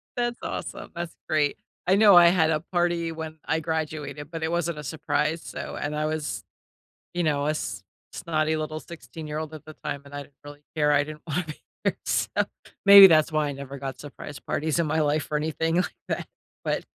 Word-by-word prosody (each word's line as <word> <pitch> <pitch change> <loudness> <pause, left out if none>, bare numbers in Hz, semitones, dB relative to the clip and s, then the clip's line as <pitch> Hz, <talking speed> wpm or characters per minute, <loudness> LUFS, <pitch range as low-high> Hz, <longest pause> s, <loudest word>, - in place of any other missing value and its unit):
That's 240 -1 -1
awesome, - - -5
that's 170 -1 -5
great. 150 -2 +1 0.3
I 190 - +5
know 205 -2 +7
I 175 -1 +9
had 165 -3 +4
a 155 - +2
party 175 -2 +1
when 160 -1 -7
I 160 - +1
graduated, 155 -2 -3
but 165 -1 -4
it 160 - 0
wasn't 170 -2 -1
a - - -6
surprise 155 +2 -1
so - - -6
and 150 +1 -2
I 155 0 0
was, 155 -1 -3 0.7
you 175 - 0
know, 145 -2 +1
a - - +3
s 105 - -4 0.3
snotty 155 -2 0
little 155 0 -3
sixteen-year-old 155 +1 -7
at 155 - -10
the 155 - -10
time, 140 - -3
and 140 - -13
I 145 - -4
didn't 140 - -21
really 145 0 -11
care. 150 -1 +3
I 145 0 +4
didn't 150 +1 -9
want 165 +3 -1
to 155 - -5
be - - -23 0.2
there. - - +1
So, - - +1 0.6
maybe 200 0 +12
that's 155 -2 +4
why 155 -1 +1
I 145 - -2
never 140 0 -7
got 135 -1 -6
surprise 145 0 -9
parties 155 +2 -1
in 165 - +2
my 155 +1 +1
life 150 0 +1
or 150 - +2
anything 160 +2 0
like 180 - 0
that, - - -2 0.4
but - - -1
155 Hz, 210 wpm, -26 LUFS, 145-165 Hz, 0.7 s, maybe